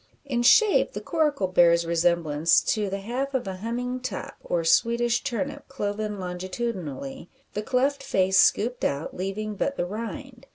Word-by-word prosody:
In 250 -4 -1
shape 410 - +5
the - - -4
coracle 300 - 0
bears 170 -2 +4
resemblance 170 -2 +2
to 210 -3 -1
the 195 +1 -4
half 260 +6 -3
of 250 - -1
a 190 -1 -4
humming 245 +5 -3
top, 255 0 -5
or 170 -1 -1
Swedish 235 +8 +2
turnip 285 +4 -4
cloven 210 -4 -3
longitudinally, 180 - -5 0.2
the 210 - -2
cleft 270 +4 0
face 190 -7 +2
scooped 240 +4 +3
out 140 +2 -2
leaving 200 +3 -3
but 280 +7 -2
the 175 - 0
rind. 230 +6 -7
215 Hz, 155 wpm, -25 LUFS, 180-250 Hz, 0.2 s, shape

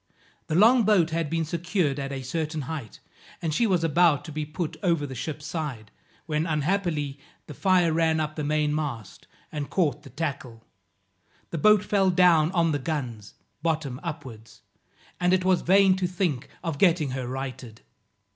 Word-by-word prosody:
The 155 - -1
long 230 +7 +6
boat 195 -7 +3
had 165 -2 -1
been 165 0 -1
secured 170 -3 -1
at 140 0 -4
a 135 -1 -5
certain 155 +3 -3
height, 140 -5 -6 0.4
and 160 -2 -2
she 230 +8 +2
was 180 -4 +1
about 165 -1 +3
to 160 - -8
be 155 0 -3
put 160 +1 -4
over 165 -5 +1
the 135 - -7
ship's 145 +4 -5
side, 145 -9 -5 0.3
when, 155 0 -1
unhappily, 155 -3 -1 0.3
the 150 - -9
fire 180 0 +2
ran 160 -1 +2
up 155 0 -2
the 150 - -3
main 150 0 +1
mast, 140 -9 -5 0.2
and 145 -2 -4
caught 150 -6 0
the 140 - -13
tackle; 130 -5 -5 0.9
the 165 - -3
boat 210 +3 +5
fell 195 -2 +2
down 175 -3 +4
on 165 -3 +2
the 145 - 0
guns, 125 -8 -5 0.3
bottom 155 -6 -1
upwards, 125 -10 -8 0.6
and 180 +1 +2
it 185 0 +2
was 185 -1 +3
vain 195 +1 +5
to 185 -1 0
think 175 -8 -2
of 165 -5 -3
getting 165 -7 +3
her 130 -1 -4
righted. 130 -3 -6
155 Hz, 175 wpm, -26 LUFS, 140-175 Hz, 0.9 s, long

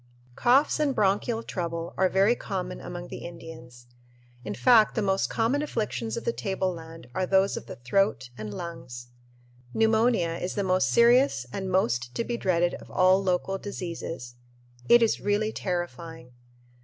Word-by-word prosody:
Coughs 265 - +3
and 285 -3 +1
bronchial 210 +3 +1
trouble 170 -4 -4
are 190 0 +2
very 195 +5 +4
common 190 -6 -5
among 175 0 -7
the - - -8
Indians. 125 -8 -11 0.6
In 105 -1 -5
fact, 230 -4 +5
the 220 - +1
most 195 -1 +1
common 235 +6 +1
afflictions 130 - -3
of - - -4
the 235 - 0
tableland 170 - -4
are 185 +4 -1
those 195 +1 +3
of - - -7
the - - -7
throat 130 - 0
and 110 -2 -6
lungs. 120 -4 -8 0.7
Pneumonia 220 -6 +2
is 180 - -3
the 200 - 0
most 185 0 +2
serious 235 - +4
and 190 -1 -3
most 120 -10 0
to - - 0
be 240 - -3
dreaded 175 -5 +1
of - - -14
all 185 +1 +4
local 190 +1 -1
diseases. 170 -10 -6 0.6
It 240 0 +7
is 225 - +1
really 205 +2 0
terrifying. 170 - -5
185 Hz, 155 wpm, -27 LUFS, 165-215 Hz, 0.7 s, It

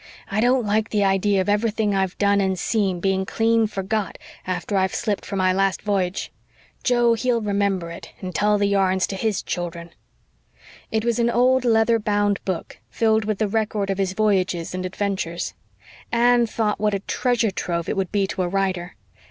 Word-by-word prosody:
"I 205 +2 +1
don't 245 0 +3
like 215 +2 +1
the 210 -2 +1
idea 195 0 +2
of 185 - -3
everything 210 0 +1
I've 190 -1 -1
done 200 0 +3
and 190 -1 0
seen 195 -2 0
being 190 +1 +1
clean 225 +2 +2
forgot 205 0 -3 0.3
after 185 +2 -2
I've 190 -1 +1
shipped 210 -3 -2
for 200 - -4
my 185 -1 +2
last 195 0 0
v'yage. 195 -3 -1 0.5
Joe, 240 -2 +3
he'll 235 +1 +1
remember 200 -5 -1
it, 170 - -10
and 185 -1 -6
tell 210 0 +2
the 205 - +1
yarns 190 -2 +2
to 195 - -5
his 215 0 -1
children." 170 -1 -5 1.0
It 220 0 0
was 235 0 +1
an 235 0 +3
old 250 +2 +3
leather 225 0 +3
bound 205 -1 0
book 185 -4 -4
filled 220 -1 +1
with 215 -1 -1
the 215 - 0
record 210 -1 -1
of 195 - -3
his 190 -1 0
voyages 190 -4 0
and 185 0 -3
adventures. 185 -3 -3 0.6
Anne 240 0 +4
thought 215 -1 -1
what 210 -1 +1
a - - -1
treasure 240 -1 0
trove 170 -3 -3
it - - -1
would 190 -2 -2
be 200 -2 +1
to 190 0 -3
a 180 - 0
writer. 185 -1 -2
200 Hz, 185 wpm, -23 LUFS, 190-220 Hz, 1.0 s, Anne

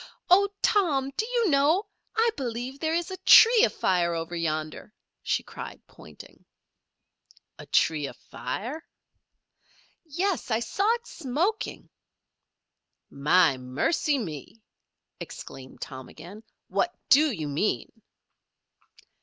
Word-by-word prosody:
"Oh, 400 +2 +6
Tom! 290 -10 +2
Do 445 - -1
you 475 -4 +1
know 300 +9 +3 0.3
I 455 +1 +3
believe 250 +2 -5
there 320 +1 0
is 345 +2 -2
a 375 - -5
tree 465 0 +8
afire 175 - +1
over 165 +1 -4
yonder," 155 +4 -4 0.3
she - - -1
cried, - - -9
pointing. - - -15 1.2
"A - - -10
tree 150 -3 +2
afire?" 240 - -6 1.2
"Yes. 345 +2 -2
I 220 -1 +1
saw 395 - 0
it 475 0 -11
smoking." 340 - -3 1.2
"My 150 +1 +3
mercy 150 - 0
me!" 195 - -7 0.6
exclaimed 130 -1 -10
Tom 130 -1 -8
again. 200 +5 -12 0.3
"What - - 0 0.2
do 300 +3 +6
you 160 -9 -4
mean?" 150 +9 -1
260 Hz, 110 wpm, -26 LUFS, -, 1.2 s, tree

